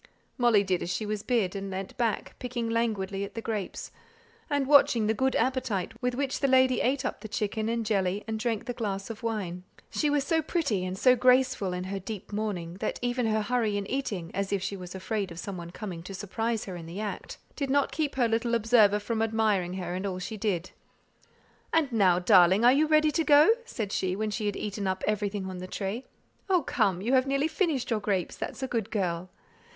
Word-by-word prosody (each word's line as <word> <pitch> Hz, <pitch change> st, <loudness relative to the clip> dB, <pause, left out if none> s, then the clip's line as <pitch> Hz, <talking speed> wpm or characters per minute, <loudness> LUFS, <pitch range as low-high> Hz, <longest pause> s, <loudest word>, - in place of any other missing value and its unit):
Molly 240 Hz, -5 st, +4 dB
did 185 Hz, -2 st, 0 dB
as -, -, -3 dB
she 215 Hz, -, -2 dB
was 210 Hz, -1 st, -2 dB
bid, 215 Hz, -6 st, 0 dB
and 195 Hz, 0 st, -4 dB
leant 190 Hz, 0 st, -5 dB
back, 230 Hz, -4 st, -1 dB
picking 240 Hz, -2 st, -3 dB
languidly 205 Hz, -4 st, -1 dB
at 200 Hz, -, -7 dB
the -, -, -3 dB
grapes, 215 Hz, -4 st, -4 dB, 0.6 s
and 285 Hz, -2 st, +1 dB
watching 260 Hz, -5 st, +5 dB
the 220 Hz, -, +2 dB
good 260 Hz, +3 st, +1 dB
appetite 250 Hz, -8 st, 0 dB
with 250 Hz, -1 st, 0 dB
which 275 Hz, 0 st, -1 dB
the 275 Hz, -, +2 dB
lady 260 Hz, -2 st, +4 dB
ate 265 Hz, +2 st, +1 dB
up -, -, -3 dB
the 220 Hz, -, -6 dB
chicken 215 Hz, +1 st, -2 dB
and 230 Hz, -1 st, -1 dB
jelly, 195 Hz, -2 st, 0 dB
and 220 Hz, 0 st, -3 dB
drank 230 Hz, 0 st, -1 dB
the 245 Hz, -, -3 dB
glass 200 Hz, -2 st, -3 dB
of 220 Hz, -, -9 dB
wine. 195 Hz, -6 st, -3 dB, 0.3 s
She 300 Hz, -, +1 dB
was 290 Hz, -1 st, +2 dB
so 320 Hz, +3 st, +1 dB
pretty 290 Hz, -, -1 dB
and 185 Hz, +1 st, -4 dB
so 250 Hz, +5 st, +5 dB
graceful 255 Hz, -5 st, +3 dB
in 180 Hz, 0 st, -3 dB
her 195 Hz, +1 st, -4 dB
deep 200 Hz, +1 st, -7 dB
mourning, 185 Hz, -5 st, -3 dB
that 215 Hz, -, -2 dB
even 245 Hz, -1 st, 0 dB
her 215 Hz, -1 st, +1 dB
hurry 220 Hz, -2 st, 0 dB
in 200 Hz, -, -3 dB
eating, 205 Hz, -9 st, -3 dB
as 195 Hz, +1 st, -2 dB
if 200 Hz, -2 st, 0 dB
she 200 Hz, +1 st, -2 dB
was 180 Hz, -1 st, -8 dB
afraid 195 Hz, +1 st, -2 dB
of 170 Hz, -, -10 dB
some 195 Hz, +2 st, -5 dB
one 170 Hz, -1 st, -7 dB
coming 180 Hz, -2 st, -6 dB
to 190 Hz, +3 st, -8 dB
surprise 225 Hz, +3 st, -2 dB
her 185 Hz, -, -6 dB
in 165 Hz, -2 st, -8 dB
the 175 Hz, +4 st, -6 dB
act, 210 Hz, -1 st, -5 dB, 0.2 s
did 280 Hz, -2 st, -2 dB
not 280 Hz, +1 st, +2 dB
keep 300 Hz, -4 st, -2 dB
her 250 Hz, -3 st, +3 dB
little 230 Hz, +1 st, +1 dB
observer 220 Hz, -2 st, +5 dB
from 220 Hz, +2 st, -2 dB
admiring 215 Hz, -5 st, +1 dB
her 180 Hz, -2 st, -4 dB
in 185 Hz, +2 st, -2 dB
all 185 Hz, -2 st, -3 dB
she 185 Hz, +4 st, -5 dB
did. 195 Hz, -5 st, -2 dB, 1.0 s
"And 315 Hz, -5 st, +2 dB
now, 195 Hz, -6 st, +4 dB
darling, 185 Hz, +2 st, +5 dB
are 245 Hz, -, +8 dB
you 305 Hz, +3 st, +3 dB
ready 305 Hz, 0 st, +4 dB
to 325 Hz, -, +1 dB
go?" 300 Hz, +5 st, +7 dB
said 220 Hz, -, -4 dB
she, 185 Hz, -2 st, 0 dB
when 215 Hz, +1 st, -2 dB
she 210 Hz, 0 st, -2 dB
had 205 Hz, -, -1 dB
eaten 205 Hz, -1 st, -3 dB
up 190 Hz, 0 st, -2 dB
everything 205 Hz, -2 st, -1 dB
on 185 Hz, -1 st, -6 dB
the 185 Hz, -, -6 dB
tray. 200 Hz, +6 st, -4 dB, 0.4 s
"Oh, 365 Hz, -4 st, +3 dB
come; 200 Hz, -9 st, +1 dB
you 240 Hz, +5 st, 0 dB
have 260 Hz, 0 st, +4 dB
nearly 275 Hz, +2 st, +1 dB
finished 315 Hz, -7 st, -1 dB
your 225 Hz, -, +2 dB
grapes; 200 Hz, -4 st, -1 dB
that's 265 Hz, -, -5 dB
a -, -, 0 dB
good 225 Hz, -4 st, -2 dB
girl. 185 Hz, -4 st, -2 dB
215 Hz, 225 wpm, -28 LUFS, 195-250 Hz, 1.0 s, are